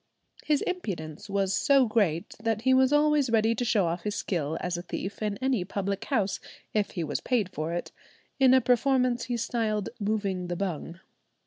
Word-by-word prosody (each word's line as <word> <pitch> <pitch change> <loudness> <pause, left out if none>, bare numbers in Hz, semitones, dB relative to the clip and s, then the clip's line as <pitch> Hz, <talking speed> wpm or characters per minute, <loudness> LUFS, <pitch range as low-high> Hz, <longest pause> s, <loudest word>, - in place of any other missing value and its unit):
His 300 -2 +1
impudence 185 - -4
was 195 -1 0
so 275 -2 +4
great 200 -8 0
that 225 -1 -1
he 260 - +4
was 260 +1 +4
always 295 -2 +3
ready 225 0 +3
to 230 - -2
show 215 -5 +2
off 170 +1 -2
his 210 +2 -3
skill 160 -4 -2
as 180 -1 -2
a 175 - -3
thief 190 +3 -6
in 210 -2 -1
any 260 -8 +1
public 200 +1 -3
house 210 -8 0 0.3
if 210 -2 +1
he 170 - 0
was - - -2
paid 230 -7 0
for 155 +2 -3
it, 175 0 -4 0.5
in 260 -1 +6
a 260 - +5
performance 250 0 +2
he 245 -1 -2
styled 215 -3 -1
"moving 200 -4 -1
the 175 - -3
bung." 175 -2 -4
210 Hz, 190 wpm, -28 LUFS, 180-250 Hz, 0.5 s, in